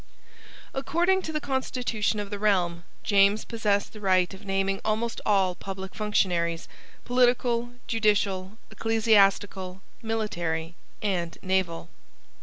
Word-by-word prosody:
According 345 +7 +1
to 320 - -5
the 305 - -1
constitution 250 -6 -1
of 205 0 -5
the 205 - -4
realm, 180 -5 +1 0.2
James 200 +1 +4
possessed 210 -3 0
the 215 - -10
right 185 -2 +2
of 190 +2 -11
naming 195 0 -1
almost 220 +2 -1
all 195 -3 +3
public 190 +1 -7
functionaries, 175 -6 0 0.4
political, 245 -1 +2
judicial, 205 -3 +1
ecclesiastical, 200 -4 +2 0.2
military, 175 -8 -2 0.3
and 175 -5 -1
naval. 185 -3 -1
205 Hz, 110 wpm, -27 LUFS, 190-225 Hz, 0.4 s, James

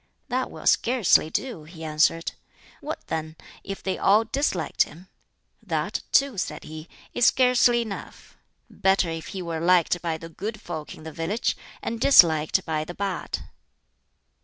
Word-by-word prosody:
"That 255 +1 -1
will - - -10
scarcely 235 -9 +4
do," 175 -4 -4
he 165 0 -11
answered. 155 +2 +1 0.5
"What, - - -6
then, 160 0 -4 0.3
if 195 0 -7
they 190 - -2
all 210 +3 +5
disliked 220 - -1
him?" 180 +5 -2 0.5
"That, - - -2
too," 275 -7 +3
said - - -4
he, 155 +1 -9 0.2
"is 245 - +4
scarcely 250 -2 +4
enough. 205 -4 -9 0.3
Better 190 -3 +1
if 165 0 -6
he 190 -2 -5
were 165 -2 -3
liked 175 0 +3
by 165 -2 -2
the 165 - -9
good 215 +6 -6
folk 160 -7 -7
in - - -14
the 160 - -7
village, 170 +9 -1 0.3
and 230 0 -4
disliked 165 - +5
by 155 -2 -1
the 175 +3 -8
bad." 195 -2 -3
180 Hz, 155 wpm, -25 LUFS, 160-220 Hz, 0.5 s, all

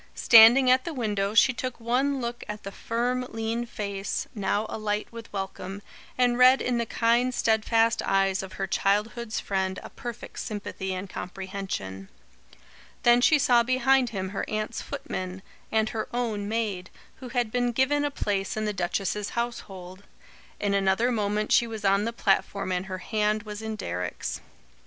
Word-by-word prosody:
Standing 240 +3 +8
at 255 0 +4
the 335 - -5
window, 210 -4 -1
she 255 +2 +6
took 255 0 -5
one 260 +4 +1
look 240 -1 -4
at 210 0 -6
the 195 - -6
firm 240 +4 -1
lean 225 +1 -3
face, 200 -3 -3
now 205 0 0
alight 210 -1 -2
with 230 -1 -10
welcome, 195 0 -5 0.3
and 245 -1 +2
read 255 +1 +7
in 245 -1 0
the 235 - -1
kind, 235 +2 +2
steadfast 225 +1 +2
eyes 195 -1 +1
of 190 -1 -8
her 195 - -2
childhood's 210 +4 0
friend 190 -1 -2
a - - -10
perfect 240 -2 -8
sympathy 205 -3 -4
and 185 +1 -4
comprehension. 185 - -6 0.9
Then 240 0 +6
she 310 +4 +5
saw 245 -4 +4
behind 255 +1 +3
him 190 -3 -4
her 195 - -3
aunt's 215 +2 -3
footman, 190 -9 -5 0.3
and 220 0 +2
her 220 - -3
own 220 -4 -2
maid, 210 -5 -2 0.3
who 255 -2 -9
had 240 -3 -1
been 245 0 +1
given 265 +4 +2
a 290 - +1
place 205 -7 -2
in 215 - -1
the 210 - -1
duchess's 195 +2 -2
household. 195 -6 -5 0.6
In 205 -1 0
another 200 +5 +2
moment 210 -1 -1
she 235 - +5
was 220 -2 -6
on 195 +1 +3
the 230 - -1
platform 200 -3 0
and 180 +1 -2
her 185 -1 -4
hand 210 +2 0
was 210 0 -7
in 220 0 -4
Deryck's. 90 - -4
215 Hz, 165 wpm, -26 LUFS, 195-240 Hz, 0.9 s, Standing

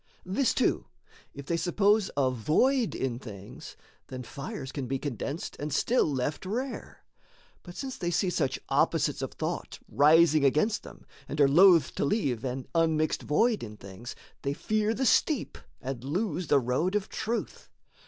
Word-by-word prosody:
This 210 +8 +1
too: 260 - +1 0.5
if 140 -1 -8
they 170 +3 0
suppose 200 +4 +2
a 130 -2 +3
void 220 - +1
in 125 -3 -2
things, 100 -6 -10 0.3
Then 130 -1 -7
fires 135 +1 -7
can 135 -4 -4
be 135 +2 -1
condensed 140 - -5
and 150 +1 -4
still 195 - +2
left 140 +2 -2
rare; 245 +8 -5 0.6
But 175 -1 -11
since 265 -1 -5
they 175 - -1
see 180 +2 +1
such 140 -7 0
opposites - - +1
of - - -4
thought - - -4
Rising 155 +1 +5
against 155 +10 +2
them, - - -13 0.2
and 150 - -4
are 140 - +6
loath 170 0 +6
to - - -2
leave 140 - 0
An 130 0 -3
unmixed 160 -2 +1
void 220 +9 +2
in 105 -2 -8
things, 100 +5 -9 0.3
they 140 - -1
fear 215 +7 0
the 265 - -1
steep 290 +3 +2 0.2
And 130 -2 -5
lose 175 +3 -2
the 145 - +4
road 135 - 0
of 210 0 0
truth. 230 +2 -4
155 Hz, 165 wpm, -28 LUFS, 135-200 Hz, 0.6 s, are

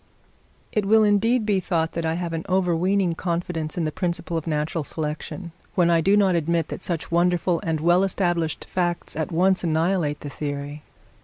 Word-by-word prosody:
It 210 - 0
will 220 +1 +6
indeed 215 +3 +3
be 205 -3 +2
thought 165 -3 -1
that 165 -1 -2
I 160 - 0
have 170 -1 -3
an 165 0 -3
overweening 185 0 +2
confidence 170 -2 -3
in 170 - 0
the 155 - -1
principle 170 0 -3
of 165 0 -3
natural 155 +1 -1
selection, 160 +4 -5 0.2
when 175 -2 +4
I 165 -1 +4
do 195 +5 +4
not 195 -3 +4
admit 170 -1 0
that - - -6
such 170 -3 -3
wonderful 175 0 +2
and 160 -2 -1
well 175 +4 +4
established 175 -4 0
facts 175 -2 -2
at 160 0 -2
once 185 +3 +2
annihilate 160 -2 0
the 145 - -6
theory. 145 +1 -5
170 Hz, 180 wpm, -24 LUFS, 160-185 Hz, 0.2 s, will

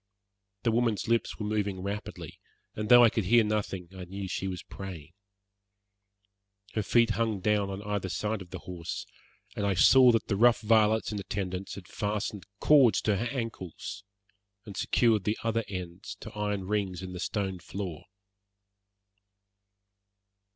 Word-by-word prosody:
The 115 - +2
woman's 115 -3 +1
lips 115 0 +1
were 105 - -4
moving 105 -3 -1
rapidly, 100 +1 -6 0.3
and 105 0 -4
though 120 0 +9
I 115 - +6
could 110 - -1
hear 115 +4 +5
nothing 105 -4 -2
I 90 -1 -7
knew 100 +3 -6
that 95 - -4
she 95 - -2
was 90 -2 -5
praying. 85 -5 -9 1.6
Her 110 - 0
feet 115 +2 +3
hung 110 -1 0
down 105 0 +1
on 100 +1 -5
either 105 -2 -2
side 105 +2 -2
of 90 - -10
the 95 - -6
horse, 85 -2 -5 0.5
and 105 - -2
I 100 -1 +1
saw 125 +9 +7
that 115 -2 +1
the 100 - -1
rough 120 +2 +5
varlets 110 0 +3
in 105 - -3
attendance 95 -1 -4
had 95 -3 -10
fastened 105 -2 -3
cords 130 -10 +5
to 105 -2 +1
her 115 - -2
ankles 110 - -5 0.6
and 100 -3 -9
secured 110 0 +2
the 105 +3 0
other 115 0 0
ends 90 0 -6
to 110 - -8
iron 105 -2 -1
rings 95 -3 -2
in 90 0 -6
the 90 - -6
stone 95 -1 -2
floor. 90 -3 -6
105 Hz, 160 wpm, -29 LUFS, 95-110 Hz, 1.6 s, though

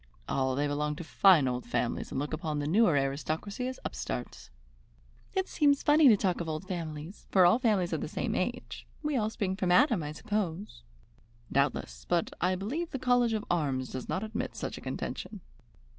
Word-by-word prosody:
"Oh, 130 -1 0
they 145 +2 +1
belong 150 +1 -1
to 170 - -7
fine 170 -4 +5
old 125 0 -2
families 120 - -2
and - - -3
look 145 +2 -3
upon 155 -1 -2
the 145 - -2
newer 185 +3 +4
aristocracy 155 - -2
as 260 - -5
upstarts." - - -5 0.9
"It 380 0 +1
seems 285 -2 +2
funny 300 0 +6
to 220 -5 +7
talk 185 -3 0
of 165 - -4
old 155 +4 -4
families, 165 -1 -6
for 185 -2 +5
all 180 +7 +5
families 210 -8 +1
are - - 0
the - - -3
same - - -2
age. - - -3 0.2
We 300 -1 0
all 215 -4 +1
spring 195 -3 -2
from 185 -2 0
Adam, 205 - +5
I 150 0 -5
suppose." 205 +1 -3 0.7
"Doubtless, 140 +1 -1
but 175 -2 +1
I 185 +2 +2
believe 275 - -3
the - - -4
College 245 -2 +2
of 215 -1 -2
Arms 135 -7 0
does 130 - -6
not 190 - -1
admit 225 +4 -4
such - - -4
a - - -9
contention." - - -5
180 Hz, 190 wpm, -30 LUFS, 150-220 Hz, 0.9 s, to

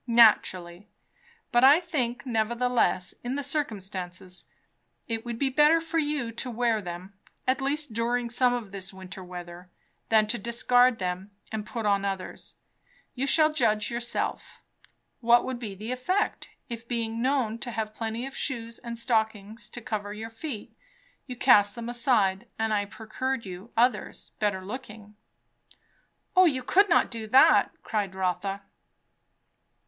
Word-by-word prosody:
"Naturally. 205 -5 +4 0.6
But 240 -1 +4
I 280 +5 +8
think 275 -10 -2
nevertheless, 235 -4 +1
in 245 +2 -2
the 285 - -2
circumstances, 190 - -4 0.6
it 225 -1 -3
would 235 -1 -5
be 270 +2 +1
better 300 +4 +5
for 330 0 -1
you 290 -6 -1
to 235 +3 -5
wear 235 -2 +1
them, 180 +1 -7 0.3
at 260 +1 +2
least 285 -2 -1
during 235 +1 0
some 250 +1 +4
of 235 -5 -3
this 195 -1 -2
winter 190 0 -9
weather, 180 0 -9 0.4
than 220 -1 +5
to 220 +2 -1
discard 245 +2 +3
them 185 +1 -3 0.2
and 215 -1 -4
put 230 -2 -4
on 200 -1 +2
others. 195 -2 -5 0.6
You 270 +2 -2
shall 310 +2 +4
judge 215 -6 +1
yourself. 235 0 -3 0.6
What 240 0 +5
would 255 -2 -4
be 210 -5 -6
the 215 +5 -6
effect, 365 +11 -1 0.2
if, 230 -1 -7
being 230 -1 -2
known 250 -4 +1
to 245 - -5
have 220 -2 -3
plenty 225 +2 -3
of 270 0 -8
shoes 230 -4 -3
and 235 -1 -6
stockings 220 -2 -1
to 240 - -8
cover 205 -2 -4
your 220 +2 -7
feet, 225 -2 -7 0.5
you 250 - -6
cast 210 -5 +5
them 235 -1 -6
aside, 235 -4 +1
and 220 -1 0
I 205 -1 +1
procured 225 +4 -4
you 185 +4 -9
others, 245 +2 +1
better 195 -3 0
looking?" 210 -2 -8 1.2
"O 370 0 +7
you 265 -6 +1
could 400 +9 +4
not 340 - +4
do 225 -2 -5
that!" 260 +5 +6
cried 200 -3 -2
Rotha. 190 +1 -2
230 Hz, 150 wpm, -27 LUFS, 205-250 Hz, 1.2 s, I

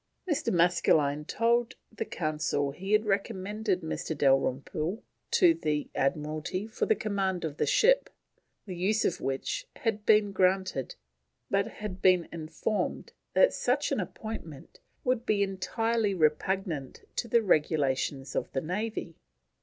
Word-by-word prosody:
Mr. 315 -6 0
Maskelyne 160 -4 +3
told 235 +4 +1 0.2
the 220 - -4
Council 150 -3 -1
he 190 +8 -4
had 215 +1 +4
recommended 200 0 -1
Mr. 160 -1 -4
Dalrymple 140 - +1 0.3
to 350 -3 +5
the 150 - -2
Admiralty 155 +7 -1
for 220 - -2
the 220 - +4
command 195 -5 -1
of 150 -2 -5
the - - +1
ship, - - +4 0.6
the 185 -4 -6
use 205 +5 +1
of 175 - 0
which 135 - -2
had 220 -2 -2
been 210 -1 +4
granted, 185 -7 +1 0.6
but 200 0 +2
had 200 -3 -7
been 180 -2 +4
informed 165 +6 -3 0.2
that - - +6
such - - 0
an - - +1
appointment 170 -10 -7 0.2
would 250 -3 +1
be 205 -4 +2
"entirely 205 +2 0
repugnant 155 -2 0
to 240 - -2
the 230 0 +3
regulations 140 -5 +1
of - - -2
the 135 - 0
Navy." 185 0 -4
185 Hz, 135 wpm, -29 LUFS, 155-215 Hz, 0.6 s, that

